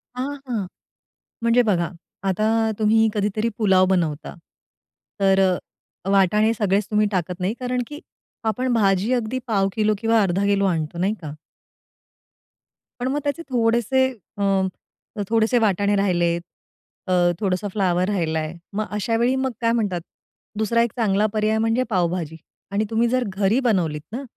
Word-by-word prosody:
हां, 270 +3 -3
हां. 225 -6 -2 0.8
म्हणजे 235 +1 +4
बघा 175 -6 +1 0.4
आता 190 +3 0 0.3
तुम्ही 220 +1 +4
कधीतरी 210 +2 0
पुलाव 190 -4 +4
बनवता. 160 -5 -1 0.9
तर 195 -1 +4 0.7
वाटाणे 210 +3 +3
सगळेच 205 -2 +1
तुम्ही 210 0 +3
टाकत 180 -1 -2
नाही 185 +3 0
कारण 250 0 -1
की 295 0 -8 0.5
आपण 255 +2 -1
भाजी 200 0 +2
अगदी 245 +1 -1
पाव 200 -4 +2
किलो 215 +1 +2
किंवा 225 +1 +3
अर्धा 195 0 +1
किलो 200 0 +2
आणतो 165 -3 -1
नाही 190 +4 +1
का? 155 -3 -6 1.7
पण 245 - -1
मग 280 +3 0
त्याचे 285 +3 -2
थोडेसे 240 +2 +2 0.3
अ, 200 - -1 0.9
थोडेसे 225 +2 +3
वाटाणे 205 -1 +2
राहिले, 175 -4 +2 0.7
अ, - - -2 0.3
थोडंसं 195 0 -1
फ्लॉवर 185 -3 +1
राहिलाय. 160 -5 -1 0.2
मग 215 +2 -1
अशावेळी 230 +4 +1
मग 265 0 -1
काय 230 0 +2
म्हणतात, 205 -7 0 0.6
दुसरा 220 +2 +2
एक 235 -1 +1
चांगला 210 -3 +2
पर्याय 215 0 +1
म्हणजे 225 +3 +1
पावभाजी 175 -5 -1 0.3
आणि 205 +2 0
तुम्ही 230 +1 +2
जर 255 +1 +1
घरी 205 +5 +3
बनवलीत 165 -9 +1
ना. 250 +5 -4
210 Hz, 140 wpm, -22 LUFS, 190-230 Hz, 1.7 s, म्हणजे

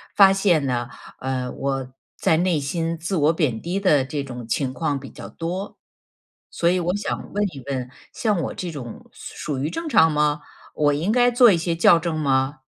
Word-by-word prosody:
发 195 -1 +7
现 180 -7 +2
呢， 120 -2 -2 0.3
呃， 130 -1 -3
我 135 -2 -3 0.2
在 160 - +2
内 175 -3 +1
心 165 +3 -2
自 170 +4 -3
我 155 +1 +3
贬 135 -9 -1
低 180 +4 -2
的 150 -9 +3
这 140 +1 -3
种 125 -4 -8
情 130 +2 -1
况 145 -1 -1
比 135 - -10
较 - - -10
多。 180 +4 -5 0.7
所 170 - 0
以 180 0 +2
我 180 +2 -1
想 205 - -4
问 205 +1 +1
一 135 - -9
问- 130 -2 -3 0.2
像 210 -6 0
我 - - -3
这 175 -2 -5
种 125 -6 -9
属- - - -10 0.2
属 - - -4
于 150 +3 -1
正 330 - -5
常 160 - +5
吗？ 150 0 +1 0.3
我 145 -1 +2
应 165 +9 0
该 245 +1 +4
做 240 -2 +6
一 175 - +3
些 165 0 -1
校 165 0 +5
正 160 -1 -2
吗？ 135 -1 0
155 Hz, 215 characters per minute, -23 LUFS, 135-180 Hz, 0.7 s, 发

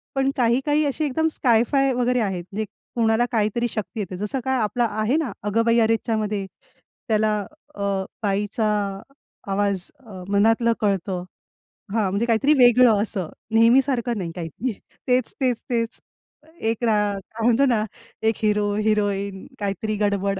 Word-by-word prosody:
पण 270 0 +2
काही-काही 270 +5 +2
अशी 290 +2 -1
एकदम 310 +3 +1
स्काय-फाय 265 +2 +2
वगैरे 250 0 +1
आहेत. 190 -5 -2
म्हणजे 215 +2 -2 0.3
कोणाला 225 0 +3
काहीतरी 225 +1 +1
शक्ती 215 +1 -5
येते. 185 -3 -4
जसं 210 +7 -2
काय 265 0 +1
आपला 220 +3 +1
आहे 215 +5 0
ना, 305 -8 -1
"अगं 210 +2 +1
बाई 230 0 +4
अरेच्चामध्ये" 220 -2 0 0.6
त्याला 215 -1 +2 0.4
अ, 200 - -4 0.4
बाईचा 205 +2 0 0.8
आवाज 195 -2 0
अ, 205 -8 -10
मनातलं 225 +3 +3
कळतं. 195 -3 0 0.7
हां, 215 -4 +1
म्हणजे 200 +4 0
काहीतरी 240 +6 +3
वेगळं 245 -4 +6
असं 190 -7 -4 0.3
नेहमी 230 +4 +6
सारखं 245 -3 -1
नाही, 175 -4 -4
काहीतरी 180 - -4 0.3
तेच, 250 -2 +1
तेच, 250 -3 +1
तेच. 230 -1 -1 0.6
एक 225 +2 -1
रा 225 - +3 0.4
काय 225 0 -2
म्हणतो 245 +3 +4
ना, 235 -5 +2 0.4
एक 220 0 +2
हीरो, 210 -1 +2
हिरोईन 200 -2 0
काहीतरी 210 +1 -2
गडबड 200 -1 0
220 Hz, 145 wpm, -23 LUFS, 205-245 Hz, 0.8 s, वेगळं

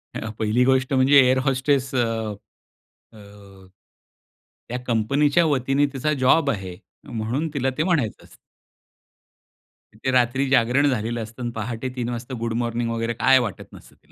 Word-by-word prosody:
अ, 110 - -4
पहिली 110 +3 +2
गोष्ट 130 +1 +1
म्हणजे 135 +2 +5
एअर 130 0 +4
होस्टेस 135 +1 0
अ, - - +1 1.2
अ, 100 -2 -16 1.0
त्या 125 - -3
कंपनीच्या 140 +8 +2
वतीने 140 0 +1
तिचा 140 +3 -1
जॉब 140 +2 +4
आहे. 95 -6 -5 0.3
म्हणून 120 +8 -3
तिला 135 -2 0
ते - - +2
म्हणायचं 160 - -1
असतं. - - -18 1.7
ते 130 - +1
रात्री 130 +2 +2
जागरण 130 +2 +3
झालेलं 120 -2 -2
असतं 115 +3 -11
आणि 120 - -3
पहाटे 115 +3 -4
3 120 -2 -3
वाजता 120 +2 -6
गुड 115 0 -2
मॉर्निंग 120 0 -2
वगैरे 115 0 -2
काय 130 0 +6
वाटत 115 -7 -6
नसतं, - - -15
तिला - - -31
125 Hz, 150 wpm, -23 LUFS, 115-135 Hz, 1.7 s, काय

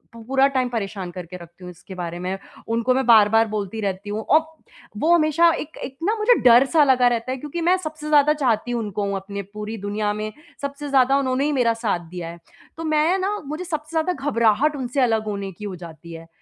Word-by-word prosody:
पूरा 265 +4 +1
टाइम 260 -2 0
परेशान 200 -5 -4
करके 180 0 -8
रखती 170 +1 -15
हूँ 180 - -8
इसके 180 +2 -12
बारे 175 -1 -5
में। 185 +2 -3 0.3
उनको 230 +2 +2
मैं 265 +1 0
बार-बार 225 -1 +5
बोलती 215 0 -4
रहती 195 +1 -3
हूँ 210 +1 -3
और 310 +7 +4 0.6
वो 320 +10 +3
हमेशा 335 0 +4
एक 310 +1 -8
एक 265 +1 -7
ना 420 +5 +1
मुझे 465 +3 +5
डर 245 +1 +7
सा 315 -2 +6
लगा 255 -3 +4
रहता 240 +1 -1
है 265 - -2
क्योंकि 300 +5 -5
मैं 350 +3 +4
सबसे 310 -3 -7
ज़्यादा 300 0 +5
चाहती 245 -5 0
उनको 210 -3 -2
अपने 200 +1 -5
पूरी 210 +1 -6
दुनिया 205 +1 -2
में, 215 +1 -4 0.3
सबसे 280 +1 -5
ज़्यादा 270 0 +4
उन्होंने 265 0 0
ही 300 - +1
मेरा 245 -5 +2
साथ 210 -7 -2
दिया 175 -2 -6
है। 170 +1 -10 0.4
तो 330 - -5
मैं 310 +3 +2
ना 400 +2 -1
मुझे 305 +5 -5
सबसे 310 -3 -4
ज़्यादा 360 +3 0 0.2
घबराहट 235 +6 +2
उनसे 265 0 -2
अलग 225 -3 +1
होने 200 -2 -4
की 200 +4 -10
हो 195 -2 -5
जाती 170 -1 -11
है। 165 0 -10
235 Hz, 215 wpm, -22 LUFS, 200-290 Hz, 0.6 s, डर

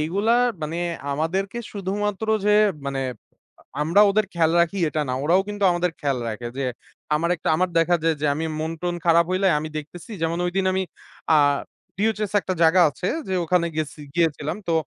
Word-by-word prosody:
এইগুলা 200 +9 +1 0.3
মানে 155 +2 -3 0.4
আমাদেরকে 190 +9 -2
শুধুমাত্র 205 +1 -2 0.2
যে 210 - +3 0.4
মানে 135 -1 -2 0.6
আ - - -20 0.2
আমরা 170 +7 +4
ওদের 215 +1 +2
খেয়াল 165 -1 +2
রাখি 170 +3 +1
এটা 155 - -2
না, - - -1
ওরাও 175 +5 +4
কিন্তু 205 -1 -5
আমাদের 175 0 0
খেয়াল 140 -4 0
রাখে 115 +2 -5
যে, 135 - -1 0.5
আমার 170 +3 0
একটা - - -4
আমার 185 +2 +1
দেখা 175 +1 +3
যায় 165 0 +2
যে 150 - +1
আমি 160 +2 -3 0.2
মনটন 165 +2 -3
খারাপ 170 0 +5
হইলে 185 +1 +1
আমি 155 - -5
দেখতেছি। 165 +7 -10
যেমন 165 +1 0
ঐদিন 190 +2 -1
আমি 190 - 0 0.5
আ - - +6 0.6
ডিওএইচএস 210 0 0
একটা 185 - -3
জায়গা 165 +3 +5
আছে 180 +6 -4 0.2
যে 190 - -1
ওখানে 170 0 +2
গেছি, 155 -1 -3
গিয়েছিলাম। 160 -1 0
তো 165 - +2
170 Hz, 180 wpm, -23 LUFS, 160-190 Hz, 0.6 s, আ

